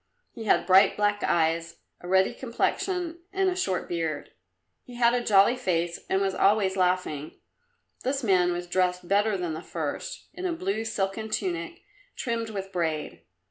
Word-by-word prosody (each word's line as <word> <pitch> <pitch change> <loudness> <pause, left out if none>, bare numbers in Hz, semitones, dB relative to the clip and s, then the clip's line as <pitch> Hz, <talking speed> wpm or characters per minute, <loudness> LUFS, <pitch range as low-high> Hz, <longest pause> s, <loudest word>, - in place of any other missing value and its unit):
He 225 -3 -7
had - - +3
bright 190 +1 +5
black 205 0 +1
eyes, 165 0 +1 0.2
a 175 - -10
ruddy 190 +1 +3
complexion 340 +7 -2
and 385 -1 +1
a - - -3
short 190 - -1
beard. 165 -4 -3 0.5
He 245 - -13
had 240 0 +4
a 245 -1 0
jolly 205 +2 +5
face, 175 -8 -1
and 190 - +2
was 195 -1 0
always 195 -1 +3
laughing. 180 -5 -1 0.6
This 270 +1 -1
man 180 -4 +3
was 175 0 -3
dressed 180 0 0
better 205 +1 +2
than 175 -3 -3
the 160 - -5
first, - - -5
in 370 - -3
a 345 - -1
blue 365 - -2
silken 220 0 -2
tunic, 185 - -3 0.3
trimmed 230 -2 -2
with 195 -2 -5
braid. 160 -4 -2
195 Hz, 165 wpm, -27 LUFS, 175-235 Hz, 0.6 s, bright